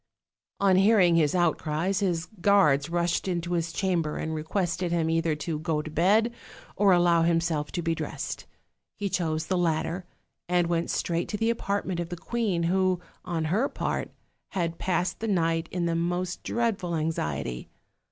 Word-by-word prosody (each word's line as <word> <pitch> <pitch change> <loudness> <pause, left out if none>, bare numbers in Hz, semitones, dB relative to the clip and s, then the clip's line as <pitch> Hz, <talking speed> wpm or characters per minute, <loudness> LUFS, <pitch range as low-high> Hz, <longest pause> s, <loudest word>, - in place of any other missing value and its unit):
On 195 -2 +4
hearing 195 -3 +5
his 155 -1 +3
outcries 170 +2 +1
his 175 -4 0
guards 175 -8 +3
rushed 175 +2 0
into 175 -1 -2
his 170 -1 -1
chamber 170 -4 0
and 160 - -3
requested 170 +2 -1
him 165 -1 +1
either 165 -1 +1
to 150 +1 -3
go 155 -2 -1
to 155 - -7
bed 210 +9 +3 0.4
or 200 -1 +4
allow 175 -2 +4
himself 165 -3 +1
to 175 - -2
be 165 0 +1
dressed. - - -5 0.5
He 200 -1 -2
chose 160 -3 -1
the 185 0 0
latter, 170 +1 0 0.4
and 175 -1 +3
went 170 0 0
straight 170 0 -1
to 210 - -2
the 225 +2 +2
apartment 200 -5 -2
of 170 -1 -3
the 175 - -5
queen, 205 -4 -1
who, 185 +1 +2 0.2
on 170 -3 -2
her 240 +8 +2
part, - - -2 0.4
had 170 -3 -2
passed 180 -1 -1
the 225 - -3
night 165 -4 +1
in 175 -1 -1
the 170 - 0
most 175 +2 -1
dreadful 205 -7 -1
anxiety. 75 - -2
175 Hz, 165 wpm, -27 LUFS, 165-190 Hz, 0.5 s, hearing